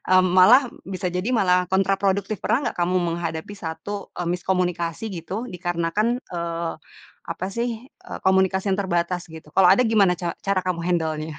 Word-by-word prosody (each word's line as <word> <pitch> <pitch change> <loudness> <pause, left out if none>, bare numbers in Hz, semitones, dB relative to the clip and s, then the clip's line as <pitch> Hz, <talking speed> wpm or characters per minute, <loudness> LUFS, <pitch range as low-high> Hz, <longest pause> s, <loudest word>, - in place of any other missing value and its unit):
eee, 185 0 +6
malah 185 +9 +6 0.2
bisa 185 0 -5
jadi 180 +6 -2
malah 180 -6 +2
kontraproduktif. 195 +1 0
Pernah 240 - +2
enggak - - -3
kamu 180 +1 +1 0.2
menghadapi 170 +3 -4
satu, 200 +3 -6
eee, 175 - -2
miskomunikasi 180 +1 -1 0.2
gitu, 220 +6 -5
dikarenakan, 180 +5 -1 0.2
eee, 170 -1 -3 0.6
apa 185 - -3
sih, 235 +5 -2 0.2
eee, - - -10
komunikasi 190 +1 +3
yang - - -5
terbatas, 175 -1 -1
gitu? 160 -2 -12
Kalau 185 -2 +6
ada 250 -2 +5
gimana 200 -6 +3
ca 170 -1 -3
cara 195 -2 0
kamu 170 -2 -1
handelnya? 160 -3 -2
185 Hz, 160 wpm, -23 LUFS, 170-195 Hz, 0.6 s, eee